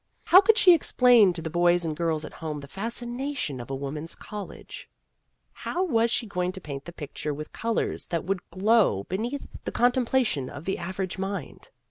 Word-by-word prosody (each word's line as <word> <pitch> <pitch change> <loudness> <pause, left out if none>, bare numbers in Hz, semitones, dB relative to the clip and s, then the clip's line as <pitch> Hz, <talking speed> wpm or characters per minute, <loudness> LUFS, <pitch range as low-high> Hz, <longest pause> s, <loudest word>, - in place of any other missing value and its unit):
How 370 - +8
could 440 +2 +4
she 370 -4 +8
explain 245 - +5
to 165 -2 -6
the 160 - -3
boys 175 +1 +3
and 155 -2 -2
girls 160 -1 -1
at - - -10
home 155 -2 -5
the 140 - -10
fascina 240 - -3
tions 135 - -2
of 120 - -10
a 135 - -2
woman's 150 +4 -5
college? 210 -2 -9 0.6
How 360 - -2
was 235 -9 +2
she 235 - +2
going 180 -3 -2
to 190 - -6
paint 140 -5 -7
the 175 - -7
picture 150 -2 -5
with 150 +1 -8
colors 230 0 -2
that 170 -2 -2
would 195 +1 -1
glow 195 - +3
beneath 235 - -3 0.2
the - - -4
contempla 250 +1 +2
tion 135 - -2
of 145 +3 -9
the 190 - -2
average 185 +1 -4
mind 195 -4 -5
190 Hz, 195 wpm, -26 LUFS, 155-235 Hz, 0.6 s, How